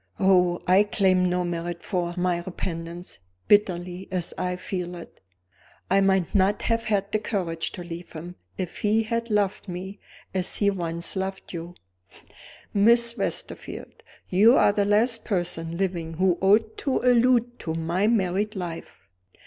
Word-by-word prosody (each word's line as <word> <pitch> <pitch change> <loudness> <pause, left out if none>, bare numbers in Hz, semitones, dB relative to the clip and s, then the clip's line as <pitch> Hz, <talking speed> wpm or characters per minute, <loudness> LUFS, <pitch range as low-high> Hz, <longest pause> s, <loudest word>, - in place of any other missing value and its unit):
Oh, 180 -2 +3
I 185 +2 +5
claim 190 -3 +2
no 180 0 0
merit 170 0 -4
for 175 -3 -2
my 180 -1 +1
repentance, 170 - -6 0.3
bitterly 185 -2 +2
as 180 -3 -2
I 180 0 -2
feel 180 -1 -4
it! 170 - -12 0.7
I 195 +1 +5
might 190 -3 +2
not 200 +1 +2
have 230 0 0
had 200 -2 0
the 215 - +1
courage 180 -7 -2
to 180 - -7
leave 170 0 -8
him 170 +2 -8 0.2
if 180 -2 -5
he 215 +2 +2
had 230 +1 -2
loved 205 -1 0
me 190 +3 -6 0.3
as 185 -1 -1
he 200 -1 +2
once 170 -2 -3
loved 190 0 -4
you." 170 +1 -7 1.0
"Miss 235 +3 +4
Westerfield, - - -4 0.3
you 215 +7 +6
are 205 - +5
the 205 -1 +1
last 225 +3 +2
person 170 -4 -2
living 175 -4 -2
who 180 0 +2
ought 215 +3 +3
to 270 - 0
allude 245 -1 +3
to 160 -1 -4
my 170 +5 0
married 210 -1 +1
life." 175 -3 -6
190 Hz, 150 wpm, -25 LUFS, 175-210 Hz, 1.0 s, you